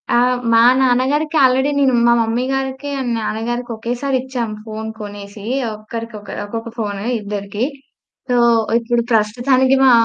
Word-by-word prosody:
ఆ! - - +2 0.4
మా 230 - +6 0.2
నాన్నగారికి 265 +5 +1
ఆల్రెడీ 265 +2 +2
నేను 270 -2 +3
మా 235 - +6
మమ్మీ 230 +2 0
గారికి 270 +1 -3
అండ్ 250 -2 -2
నాన్నగారికి 235 +3 -3
ఒకేసారిచ్చాం 250 +1 -2 0.2
ఫోన్ 220 0 -6
కొనేసి 205 0 -8 0.3
ఒక్కరికొక 215 0 -8 0.2
ఒక్కొక్క 225 +2 -5
ఫోను 205 -3 -3 0.2
ఇద్దరికీ. 205 +1 -4 0.7
సో, 250 - +2 0.4
ఇప్పుడు 235 0 0
ప్రస్తుతానికి 250 +5 +3
మా 260 - +7
235 Hz, 125 wpm, -18 LUFS, 215-260 Hz, 0.7 s, మా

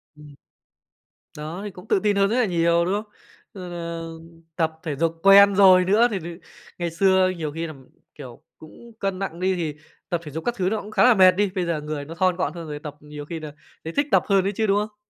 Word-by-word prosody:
Ừm. 150 -1 -15 1.0
Đó, 155 +5 -6
thì 205 - -6
cũng 180 - -14
tự - - +2
tin 205 0 +1
hơn 195 0 +2
rất 230 - 0
nà 250 -2 +2
nhiều, 170 -1 +2
đúng 185 - -1
không? 210 +1 -4 0.4
Rồi 185 -3 -8
nà 170 -1 -5 0.6
tập 160 -2 -1
thể 155 -5 -3
dục 165 +2 -1
quen 200 0 +7
rồi 185 -2 +6
nữa, 220 +5 +4
thì-thì 175 -4 -5 0.4
ngày 170 -2 -3
xưa 190 +1 +3
nhiều 155 -3 -4
khi 165 +2 -4
là, 155 - -8 0.4
kiểu, 120 -2 -11
cũng 230 +9 -15
cân 195 -2 -2
nặng 190 -4 -5
đi, 185 +1 +1
thì 155 -4 -4 0.3
tập 175 -1 -1
thể 150 - -9
dục 160 +2 -6
các 240 0 -1
thứ 185 -2 0
nó 220 +1 -2
cũng 210 - -11
khá - - +3
là 250 -1 +7
mệt 185 -3 +6
đi, 200 +1 0
bây 180 -2 -1
giờ 165 -3 -2
người 150 -1 -5
nó 165 +2 -9
thon 185 0 +1
gọn 185 - -2
hơn 170 -2 -8
rồi, 150 -1 -6
tập 150 -1 -8
nhiều 150 0 -10
khi 165 +1 -6
nà 155 -2 -8 0.3
thấy 160 - -6
thích 285 0 +1
tập - - +4
hơn 195 -2 +3
ấy 200 - 0
chứ, 220 -1 0
đúng 200 +1 +3
không? 210 - -29
180 Hz, 250 wpm, -23 LUFS, 160-195 Hz, 1.0 s, quen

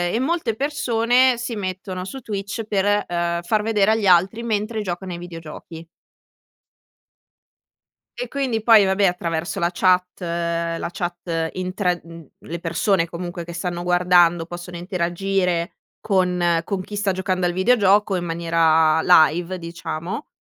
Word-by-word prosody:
e - - +1
molte 265 -4 -1
persone 250 -2 +2
si 240 0 -4
mettono 185 -2 -5
su 265 +9 -7
Twitch 205 0 -4
per, 205 0 +1
uhm, 170 0 -1
far 215 +4 +1
vedere 215 -1 +2
agli 220 -2 +1
altri 185 +5 +4
mentre 220 -1 -2
giocano 185 -1 -5
i 170 - -6
videogiochi. 165 -1 -10 2.3
E, - - -4
quindi 260 -6 -2
poi, 220 -3 +6
vabbè, 190 +1 +2
attraverso 170 -2 -2
la 170 0 +1
chat 180 0 +2
la 170 -1 -2
chat 170 -2 -3
in 185 0 -4
tra 180 -3 0
mhmm, 165 -2 -12
le 170 +1 -6
persone, 170 +2 +1
comunque, 175 0 -6
che 170 +1 -9
stanno 175 0 -3
guardando 175 -1 +3
possono 175 +1 -8
interagire 180 0 -1 0.3
con 180 -4 +1
con 195 +1 -3
chi 205 +3 -8
sta 205 -1 0
giocando 185 -1 -1
al 175 - -2
videogioco 200 0 +3
in 175 -1 -2
maniera 165 -1 +2
live, 175 +2 +4
diciamo, 170 - -6
180 Hz, 140 wpm, -22 LUFS, 170-205 Hz, 2.3 s, poi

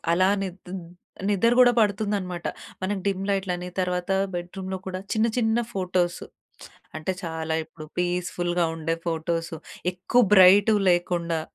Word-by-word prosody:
అలా 185 +2 +4
నిద్‌ద్ 185 -1 -7 0.6
నిద్ర 210 +3 +3
గూడా 245 -1 +7
పడుతుందనమాట. 200 -4 -1 0.4
మనం 200 +2 -1
డిమ్ 195 -1 0
లైట్‌లని 180 -2 -1
తర్వాత 180 0 -2 0.2
బెడ్ 175 0 -4
రూమ్‌లో 190 0 -4
గూడా 185 0 -4
చిన్న 220 +1 +2
చిన్న 225 -1 +2 0.2
ఫోటోస్ 180 -2 0 0.8
అంటే 155 +4 -2
చాలా 160 -1 -3
ఇప్పుడు 155 -1 -12
పీస్‌ఫుల్‌గా 175 -1 0
ఉండే 165 0 -1
ఫోటోస్ 165 0 -2 0.4
ఎక్కువ 205 +7 +2
బ్రైటువి 200 +2 +7
లేకుండా 175 -2 0
180 Hz, 125 wpm, -25 LUFS, 175-195 Hz, 0.8 s, గూడా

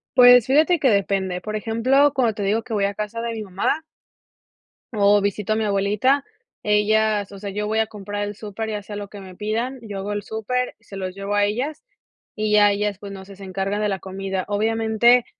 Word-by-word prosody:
Pues, 245 -1 +8
fíjate 315 +5 +4
que 270 - +3
depende, 195 -3 0
por 215 0 -3
ejemplo, 255 +6 +3
cuando 245 -5 +2
te 205 - -3
digo 215 +3 +1
que 225 - -7
voy 200 -1 +2
a 200 - -1
casa 210 +3 -4
de 230 0 -3
mi 220 - -5
mamá 200 +11 -1 1.1
o 205 -1 +4
visito 205 +1 -1
a - - 0
mi 220 - 0
abuelita, 210 +7 +2 0.4
ellas, 210 0 +2
o 200 - -10
sea, 200 0 -5
yo 210 +1 -3
voy 220 +1 0
a 220 - +2
comprar 205 0 -5
al 205 0 -4
súper, 215 +1 -5
ya 210 -1 -3
sea 205 +1 -8
lo 205 -1 -5
que 205 - -10
me 185 -1 -11
pidan, 230 +6 -2
yo 205 -3 -6
hago 205 +2 -3
el 205 -1 -3
súper, 250 +4 -2
se 195 - -13
los 185 -1 -4
llevo 195 +1 -3
a 205 - +3
ellas 265 - -3 0.5
y 215 -1 -1
ya 210 -1 +6
ellas, 205 -1 -1
pues, 200 -1 -8
no 190 -1 -9
sé, 195 0 -12
se 195 - -12
encargan 195 +2 -2
de 210 - +1
la 195 -2 -2
comida, 190 -1 -4
obviamente, 225 +3 +3
210 Hz, 220 wpm, -22 LUFS, 200-225 Hz, 1.1 s, Pues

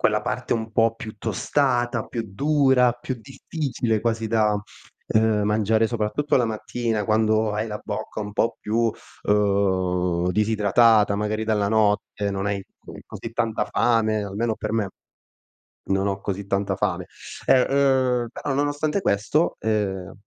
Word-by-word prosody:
quella - - +2
parte - - -2
un 110 -1 -4
po' 115 0 +3
più 110 -1 -9
tostata, 120 +2 0
più 115 - -4
dura, 130 +2 +3
più 120 +1 -5
difficile 125 -3 -3
quasi 115 0 -1
da, 110 -2 +2 0.5
uhm, 110 -1 +2
mangiare, 110 +1 +2
soprattutto 120 +6 0
la 125 -3 +2
mattina 110 0 -2
quando 110 0 +2
hai 105 +2 -2
la 105 -1 -5
bocca - - -5
un 105 0 -5
po' 115 - 0
più, 115 +2 0 0.4
uhm, 95 -4 +1
disidratata, 105 +1 +3
magari 105 +1 -1
dalla 105 -2 +1
notte, 105 -1 +1
non 100 0 -2
hai 100 -1 -2 0.4
così 115 - -7
tanta 115 -2 0
fame, 110 -2 +1
almeno 105 +3 -2
per 110 - -4
me 110 -3 0 1.0
non 95 +1 +1
ho 100 0 -2
così 100 0 -4
tanta 100 0 0
fame. - - -1 0.4
E, 130 - +5
uhm, 130 -3 +2
però 140 - -4
nonostante 145 +5 0
questo, 130 - +1
ehm, 100 -4 -2
110 Hz, 140 wpm, -23 LUFS, 105-120 Hz, 1.0 s, E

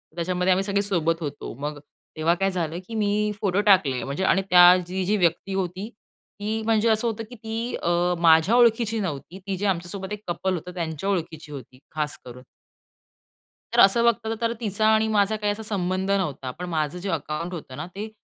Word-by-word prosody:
त्याच्यामध्ये 180 +2 0
आम्ही 190 +1 +2
सगळे 200 0 0
सोबत 165 -4 0
होतो. 145 -5 -5
मग 145 0 -4 0.4
तेव्हा 165 +2 +2
काय 195 +1 0
झालं, 170 -2 -3
की 225 - -7
मी 210 0 +1
फोटो 200 0 +1
टाकले 135 -9 +3
म्हणजे. 140 +7 -3
आणि 195 - +3
त्याची 180 0 +7
जी-जी 190 +3 +1
व्यक्ती 175 +2 0
होती, 190 +3 -3 0.5
ती 215 +2 -2
म्हणजे 225 0 +2
असं 220 +2 +2
होतं, 225 0 -3
की 245 - -10
ती 225 +2 -4
अ, 170 - +1 0.3
माझ्या 165 +6 +5
ओळखीची 230 -2 +3
नव्हती. 175 0 -5
ती 195 -1 -2
जे 205 - -3
आमच्यासोबत 190 +2 -3
एक 210 - -6
कपल 180 +2 -1
होतं, 180 +1 -5
त्यांच्या 170 +1 -3
ओळखीची 160 -5 -3
होती 130 -2 -10
खास 150 -1 -2
करून. 125 +1 -11 1.3
तर - - +1
असं 195 +4 +6
बघतात 225 -1 +1
तर 230 0 +1
तिचा 215 -1 0
आणि 220 0 +3
माझा 210 0 +2
काही 210 -1 -1
असा 220 +1 -8
संबंध 190 -1 -1
नव्हता. 145 -9 -1
पण 180 +7 -7
माझं 155 0 -1
जे 190 +2 -5
अकाउंट 165 +2 -3
होतं 145 -6 -8
ना, 155 - -4
ते 215 +2 -6
190 Hz, 190 wpm, -24 LUFS, 165-210 Hz, 1.3 s, त्याची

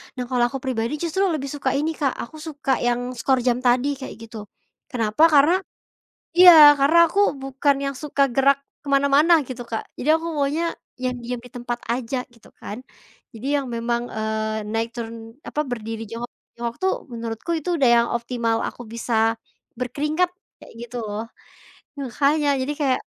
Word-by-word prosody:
Nah, 250 - -3
kalau 245 -2 +2
aku 270 - -4
pribadi 240 -1 -2
justru 360 +4 0
lebih 275 -2 -3
suka 280 -2 -2
ini 300 +3 0
Kak 275 -3 0
aku 310 +7 -9
suka 285 -4 -2
yang 245 0 0 0.2
skor 265 +2 +2
jam 245 -1 +1
tadi 255 +3 +2
kayak 265 - -7
gitu, 225 0 -9 0.5
kenapa? 230 +4 +1
Karena 295 +4 +6 0.9
iya, 360 -1 +11 0.3
karena 290 +5 +4
aku 405 - +1 0.2
bukan 270 +1 +1
yang 275 0 -2
suka 285 -1 0
gerak 275 +1 +4 0.2
ke - - -28
mana-mana 280 +4 +4 0.2
gitu 245 -1 -6
Kak. 225 -1 -3 0.2
Jadi 285 - -3
aku 325 +1 -1
maunya 290 +4 0 0.4
yang 250 0 0
diam 240 0 -5
di 245 - -13
tempat 240 -1 -4
aja 250 +1 -2
gitu 230 - -19
kan. 210 - -7 0.6
Jadi 230 +4 -7
yang 275 - -4
memang, 235 +1 -1
eee, 220 0 -2
naik 230 +1 -2
turun 225 -1 -7
apa 300 - -3
berdiri 225 -2 -5
jongkok 235 +3 -6 0.2
jongkok 235 0 -4
tuh 380 - +3 0.2
menurutku 230 +6 -5
itu 345 +3 -2
udah 260 -3 +4
yang 235 - +3
optimal 235 -1 -1
aku 245 - -9
bisa, 225 -1 +1 0.4
berkeringat 300 +8 0 0.3
kayak - - -15
gitu 240 +1 -8
loh. 210 +1 -4 0.8
Makanya 280 +3 +1
jadi 290 +3 -2
kayak, 265 -2 +2
250 Hz, 170 wpm, -23 LUFS, 230-280 Hz, 0.9 s, iya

